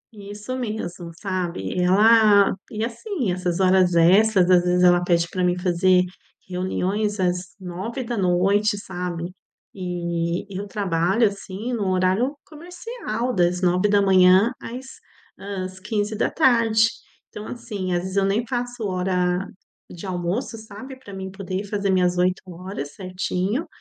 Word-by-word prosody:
Isso 205 Hz, +5 st, -7 dB
mesmo, 190 Hz, -8 st, -5 dB
sabe? 185 Hz, -, -3 dB, 0.2 s
E 180 Hz, -, 0 dB
ela 205 Hz, +2 st, +5 dB, 0.2 s
e, 220 Hz, +1 st, -2 dB
assim, 245 Hz, -, -3 dB
essas 180 Hz, 0 st, -2 dB
horas 185 Hz, -2 st, +4 dB
extras, 185 Hz, +2 st, +5 dB
às 175 Hz, -1 st, +6 dB
vezes 180 Hz, 0 st, +2 dB
ela 175 Hz, 0 st, +5 dB
pede 170 Hz, -1 st, +2 dB
pra 185 Hz, -1 st, -2 dB
mim 180 Hz, 0 st, +2 dB
fazer 180 Hz, 0 st, +3 dB, 0.4 s
reuniões 190 Hz, +3 st, -1 dB
às 180 Hz, 0 st, -1 dB
21:00, 200 Hz, 0 st, 0 dB
sabe? 180 Hz, -2 st, -5 dB, 0.4 s
E 175 Hz, -1 st, -2 dB
eu 200 Hz, +2 st, -4 dB
trabalho, 195 Hz, +2 st, +1 dB
assim, 200 Hz, +4 st, -6 dB
no 205 Hz, -5 st, -1 dB
horário 190 Hz, +10 st, +1 dB
comercial 330 Hz, -, -5 dB
das 180 Hz, 0 st, +1 dB
9:00 190 Hz, +2 st, +4 dB
às 250 Hz, +3 st, -7 dB, 0.5 s
hã, 195 Hz, -1 st, -5 dB
às 185 Hz, 0 st, -9 dB
15:00. 220 Hz, -, +2 dB, 0.4 s
Então, 210 Hz, +1 st, -8 dB
assim, 210 Hz, -6 st, -5 dB
às 175 Hz, -, +1 dB
vezes 190 Hz, +1 st, -5 dB
eu 195 Hz, -, +3 dB
nem 210 Hz, +5 st, 0 dB
faço 245 Hz, -1 st, -4 dB
hora 180 Hz, 0 st, 0 dB, 0.4 s
de 175 Hz, +2 st, -9 dB
almoço, 185 Hz, +6 st, -3 dB
sabe, 220 Hz, +5 st, -10 dB
pra 235 Hz, -6 st, -13 dB
mim 190 Hz, -1 st, -6 dB
poder 195 Hz, -1 st, -4 dB
ir -, -, -8 dB
fazer 200 Hz, -1 st, -2 dB
minhas 180 Hz, -1 st, +2 dB
8 185 Hz, +1 st, +2 dB
horas 180 Hz, -5 st, -7 dB
certinho. 190 Hz, -, -2 dB
190 Hz, 135 wpm, -23 LUFS, 180-215 Hz, 0.5 s, às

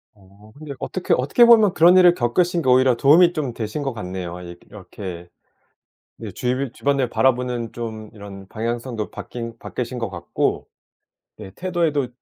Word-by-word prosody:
어 100 Hz, +2 st, -20 dB
근데 145 Hz, -1 st, -8 dB
어떻게 185 Hz, -, -2 dB
어떻게 140 Hz, -, +3 dB
보면 220 Hz, -5 st, +6 dB
그런 175 Hz, +3 st, +6 dB
일을 180 Hz, -1 st, +7 dB
겪으신 175 Hz, +6 st, 0 dB
게 130 Hz, -, 0 dB
오히려 130 Hz, 0 st, +4 dB
도움이 165 Hz, +8 st, +5 dB
좀 145 Hz, -7 st, -3 dB
되신 115 Hz, +6 st, -5 dB
것 135 Hz, -2 st, -3 dB
같네요. 90 Hz, -4 st, -6 dB
이게 85 Hz, 0 st, -10 dB
이렇게 95 Hz, -3 st, -9 dB, 0.9 s
네 -, -, -7 dB
주위 130 Hz, +1 st, -2 dB
주변을 140 Hz, -2 st, 0 dB
바라보는 120 Hz, 0 st, 0 dB
좀 110 Hz, -2 st, -7 dB
이런 100 Hz, -2 st, -11 dB
방향성도 115 Hz, +1 st, -4 dB
바뀐 115 Hz, -1 st, -8 dB
바뀌신 125 Hz, 0 st, -5 dB
것 115 Hz, -2 st, -3 dB
같고 85 Hz, -2 st, -3 dB, 0.7 s
네 105 Hz, -3 st, -10 dB
태도에도 165 Hz, -7 st, -1 dB
120 Hz, 330 characters per minute, -21 LUFS, 105-145 Hz, 0.9 s, 일을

